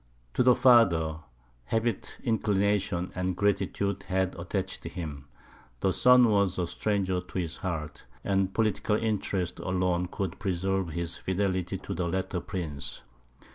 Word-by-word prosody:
To - - +2
the 125 0 +6
father, 90 -11 +5 0.5
habit, 115 - -1
inclination, 100 -4 +1
and 90 -1 -1
gratitude 100 -1 0
had 95 -1 0
attached 95 +2 -4
him; 75 -6 -6 0.5
the 95 - +2
son 125 -1 +6
was 100 -3 +2
a 90 - +1
stranger 95 0 -1
to 90 +1 -8
his 85 -3 -2
heart, 80 -8 -5 0.2
and 95 -1 +1
political 110 0 +1
interests 100 -5 -1
alone 90 -1 0
could 95 0 -4
preserve 95 -1 0
his 85 +1 -3
fidelity 95 0 -1
to 100 - -6
the 90 -1 -1
latter 95 +1 -1
prince. 80 -6 -4
95 Hz, 135 wpm, -28 LUFS, 90-100 Hz, 0.5 s, the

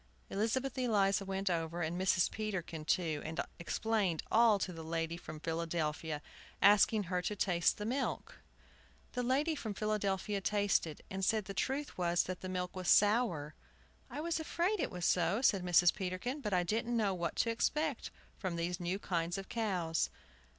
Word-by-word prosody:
Elizabeth 230 +6 0
Eliza 205 -5 +2
went 195 0 -3
over, 170 -1 0
and 170 +3 -2
Mrs. 185 -1 +3
Peterkin 185 -7 -4
too, 160 -3 +1
and 160 +1 -5 0.2
explained 195 -1 0
all 225 -2 +6
to 185 -2 -3
the 165 -1 -7
lady 165 0 -2
from 165 -3 -8
Philadelphia, 160 -2 -2 0.4
asking 205 +1 +5
her 180 0 -1
to 210 +4 -2
taste 175 -4 +2
the 210 - -4
milk. 260 +4 -2 0.7
The 250 - -2
lady 275 +6 +1
from 220 -9 -5
Philadelphia 205 -1 -1
tasted, 200 -6 0
and 190 0 -3
said 215 +1 +2
the 195 - -6
truth 270 +4 -2
was 175 0 +2
that 185 0 -5
the 185 - -5
milk 180 0 -3
was 185 -1 -4
sour! 205 -9 +3 0.6
"I 285 +5 -5
was 335 0 -1
afraid 345 +6 0
it - - 0
was 180 -1 -4
so," 180 +4 +2
said 195 -7 +4
Mrs. 175 0 +5
Peterkin; 195 +9 -3
"but 210 - -3
I 180 -2 +3
didn't 230 +6 0
know 205 -4 +2
what 175 -2 -2
to 230 - +1
expect 300 +4 -1 0.3
from 185 -4 -2
these 170 +2 -2
new 175 +2 -1
kinds 175 -3 -2
of 195 - -7
cows." 180 -8 0
190 Hz, 170 wpm, -34 LUFS, 170-220 Hz, 0.7 s, all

